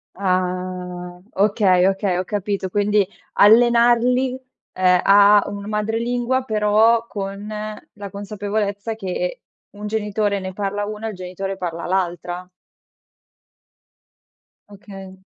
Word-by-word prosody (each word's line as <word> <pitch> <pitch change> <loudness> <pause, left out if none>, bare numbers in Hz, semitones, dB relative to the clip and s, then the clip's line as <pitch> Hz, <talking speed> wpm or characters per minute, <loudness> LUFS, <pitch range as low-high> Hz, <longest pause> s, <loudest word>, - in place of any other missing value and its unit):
Ah. 180 -1 -3
Okay, 195 -2 +3
okay, 195 -1 0
ho 180 - 0
capito, 200 0 -3
quindi 205 +1 +2 0.3
allenarli, 240 +3 +4 0.3
ehm, 180 -1 +3
a 205 +1 +6
un 200 0 -6
madrelingua, 235 +4 -1
però 220 +1 +3
con 200 0 -6 0.5
la 205 -1 -8
consapevolezza 205 +2 -3
che 225 - -4 0.3
un 210 +1 -7
genitore 210 -1 -1
ne 190 0 -6
parla 205 +1 -2
una 215 +1 -5
e - - -2
il - - -10
genitore 185 +1 -5
parla 170 -2 -4
all'altra. 180 -1 -2 2.2
Okay. 195 -2 -11
200 Hz, 105 wpm, -21 LUFS, 185-215 Hz, 2.2 s, a